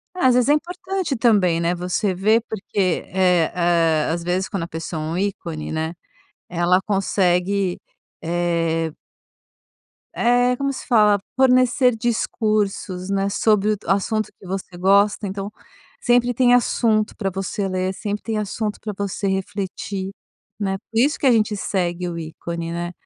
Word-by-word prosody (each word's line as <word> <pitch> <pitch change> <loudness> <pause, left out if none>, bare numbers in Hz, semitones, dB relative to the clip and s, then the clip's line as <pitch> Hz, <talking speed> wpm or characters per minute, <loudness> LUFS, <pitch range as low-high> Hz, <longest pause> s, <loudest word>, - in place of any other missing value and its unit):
Às 260 -8 +3
vezes 250 +2 +3
é - - +7
importante 355 0 -2
também, 200 -8 +3
né, 170 +1 0
você 180 +2 -1
ver, 215 +5 +3
porque 190 -3 -1
eh, 180 -3 +3
ah, 165 -3 +2
às 170 0 -2
vezes 180 +2 -1
quando 195 -5 -3
a - - -4
pessoa 160 0 -5
é - - -4
um 165 +2 -2
ícone, 175 -5 -3
né, 160 +1 -2 0.6
ela 175 +2 +2
consegue, 190 -1 +1 0.4
eh 165 -1 0 1.2
eh, 245 +1 +3
como 275 0 -1
se - - -8
fala? 210 -4 +4 0.2
Fornecer 255 -1 +4
discursos, 210 -5 -1
né, 195 0 0
sobre 210 0 +2
d 205 - -17
o - - -6
assunto 215 +2 0
que - - -15
você 185 -1 -5
gosta. 200 +2 +3
Então 195 +2 -5 0.5
sempre 245 0 +3
tem 245 0 +4
assunto 225 -3 +2
pra 195 -3 -2
você 195 +1 -3
ler, 185 0 -1
sempre 205 0 -4
tem 220 -2 -2
assunto 210 0 -3
pra 210 -1 -5
você 200 0 -2
refletir, 190 0 -3 0.5
né? 195 -1 -1
Por 225 +3 -4
isso 285 +5 +2
que - - -2
a 260 - +6
gente 215 -2 +2
segue 180 -3 -2
o 170 -1 -4
ícone, 165 +1 -5
né? 175 +1 -4
195 Hz, 155 wpm, -21 LUFS, 175-220 Hz, 1.2 s, é